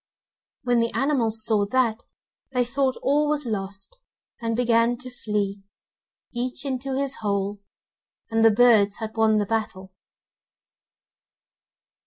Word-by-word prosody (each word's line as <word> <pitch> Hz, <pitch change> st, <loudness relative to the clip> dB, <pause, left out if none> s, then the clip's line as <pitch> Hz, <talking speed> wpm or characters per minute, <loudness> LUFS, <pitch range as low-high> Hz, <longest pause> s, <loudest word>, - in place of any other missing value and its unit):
When 245 Hz, -2 st, +2 dB
the 230 Hz, 0 st, +1 dB
animals 230 Hz, -4 st, +1 dB
saw 210 Hz, -3 st, +2 dB
that, 235 Hz, -1 st, 0 dB, 0.5 s
they 250 Hz, -1 st, +2 dB
thought 260 Hz, +2 st, 0 dB
all 295 Hz, +2 st, +2 dB
was 300 Hz, -2 st, 0 dB
lost, 200 Hz, -, -5 dB, 0.4 s
and 230 Hz, -1 st, -1 dB
began 235 Hz, 0 st, +2 dB
to 255 Hz, 0 st, -9 dB
flee, 205 Hz, -4 st, -3 dB, 0.7 s
each 250 Hz, +3 st, -3 dB
into 265 Hz, 0 st, -2 dB
his 275 Hz, -1 st, -2 dB
hole, 200 Hz, -1 st, -2 dB, 0.7 s
and 225 Hz, 0 st, +2 dB
the 225 Hz, -, +8 dB
birds 215 Hz, -3 st, +4 dB
had 220 Hz, 0 st, -6 dB
won 220 Hz, -1 st, +3 dB
the 205 Hz, -, +1 dB
battle. 195 Hz, -3 st, -3 dB
230 Hz, 125 wpm, -24 LUFS, 210-255 Hz, 0.7 s, the